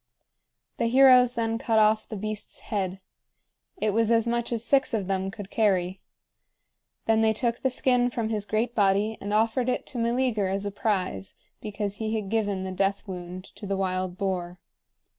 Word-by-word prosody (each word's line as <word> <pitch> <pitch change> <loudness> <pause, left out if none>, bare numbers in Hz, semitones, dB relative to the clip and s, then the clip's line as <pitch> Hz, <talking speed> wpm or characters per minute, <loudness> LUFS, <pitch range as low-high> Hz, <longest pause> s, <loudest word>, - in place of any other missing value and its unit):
The 230 - +1
heroes 250 0 +6
then 225 -1 -1
cut 225 -2 +1
off 215 0 +3
the 220 - -5
beast's 215 +1 -5
head. 190 -2 -3 0.8
It 215 - 0
was 225 +1 +2
as 230 -1 +3
much 235 0 -1
as 235 -1 -2
six 270 -3 +2
of 205 -3 -1
them 190 0 -1
could 200 0 -9
carry. 190 -4 +1 1.0
Then 225 0 +3
they 220 0 +3
took 235 +1 -1
the 265 - +1
skin 250 -1 +2
from 230 -2 -2
his 210 -2 -2
great 230 +2 0
body 205 +1 +2
and 205 - -4
offered 230 +4 +2
it 250 - -1
to 245 - -3
Meleager 235 -3 +1
as 195 +1 -2
a 200 - -2
prize, 185 - -2 0.3
because 205 -1 -4
he 220 0 -2
had 210 -3 -3
given 205 -4 0
the 190 - -4
death 195 +2 -1
wound 180 0 -7
to 205 - -8
the 195 0 -1
wild 185 -1 -2
boar. 180 -2 -2
215 Hz, 180 wpm, -26 LUFS, 195-230 Hz, 1.0 s, heroes